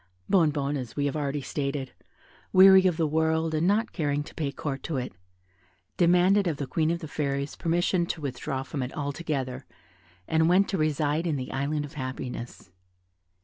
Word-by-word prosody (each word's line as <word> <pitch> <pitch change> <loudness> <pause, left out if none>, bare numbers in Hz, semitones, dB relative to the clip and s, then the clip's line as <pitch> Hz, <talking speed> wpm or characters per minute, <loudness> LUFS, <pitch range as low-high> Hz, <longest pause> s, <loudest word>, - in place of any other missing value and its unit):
Bonnebonne, 150 -5 +2
as 125 -4 -6
we 145 - 0
have 140 - -1
already 145 -1 -2
stated, 140 -1 -3 0.6
weary 190 0 +8
of 175 -3 0
the 165 - +2
world, 160 +1 +1
and 155 +3 +1
not 215 +3 +2
caring 145 -4 -1
to - - -13
pay 145 -3 -2
court 140 -1 -4
to 155 - -3
it, 125 -1 -4 0.8
demanded 180 +3 +4
of 160 -4 -1
the 140 - -3
Queen 155 +3 0
of 170 +1 -1
the 160 - -6
Fairies 140 -1 -2
permission 175 +1 +1
to 170 - -3
withdraw 135 0 -3
from 135 +1 -5
it 125 0 -3
altogether, 140 -3 -3 0.6
and 160 +1 +3
went 190 +3 +4
to 195 - -1
reside 155 +2 0
in 155 - 0
the 130 -2 -4
Island 145 +2 -1
of 145 - -12
Happiness. 130 - -6
150 Hz, 180 wpm, -27 LUFS, 140-170 Hz, 0.8 s, weary